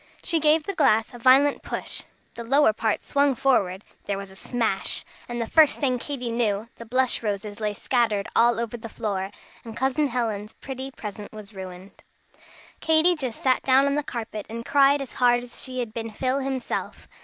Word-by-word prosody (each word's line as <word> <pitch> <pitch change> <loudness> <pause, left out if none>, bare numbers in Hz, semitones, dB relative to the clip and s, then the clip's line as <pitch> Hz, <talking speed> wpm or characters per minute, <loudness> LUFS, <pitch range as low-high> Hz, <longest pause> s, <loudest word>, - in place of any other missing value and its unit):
She 330 - +1
gave 305 +1 +4
the 395 - -4
glass 225 - +2
a 240 - -9
violent 265 +4 +5
push. - - -4 0.3
The 235 - -7
lower 270 -1 +4
part 220 0 -1
swung 280 -1 +2
forward, 205 -7 +1 0.2
there 200 - -2
was 195 -1 -7
a - - -14
smash, 225 -2 -1 0.2
and 240 0 -3
the 230 - 0
first 310 +5 +4
thing 255 -4 +1
Katy 250 -3 -4
knew, 225 -2 0
the 230 - -10
blush 255 +2 +1
roses 205 -1 -3
lay 210 -1 -1
scattered 215 -2 0
all 235 0 +4
over 235 +1 -3
the 230 0 -8
floor, 200 -4 -3 0.3
and 225 -1 -9
Cousin 270 +3 +1
Helen's 225 -4 -2
pretty 265 0 -7
present 210 -5 -8
was 215 -1 -10
ruined. 185 0 -10 0.8
Katy 320 +2 +4
just 260 -7 -4
sat 260 -1 +3
down 265 +1 +4
on 280 - +1
the 295 - +1
carpet 225 -6 -6
and 230 +1 -6
cried 280 0 +4
as 260 - -11
hard 245 -1 +3
as 245 - -10
if - - -9
she 255 -1 -3
had 225 -3 -5
been 225 -1 -4
Phil 255 +5 -1
himself. 265 -2 -4
240 Hz, 195 wpm, -25 LUFS, 215-270 Hz, 0.8 s, violent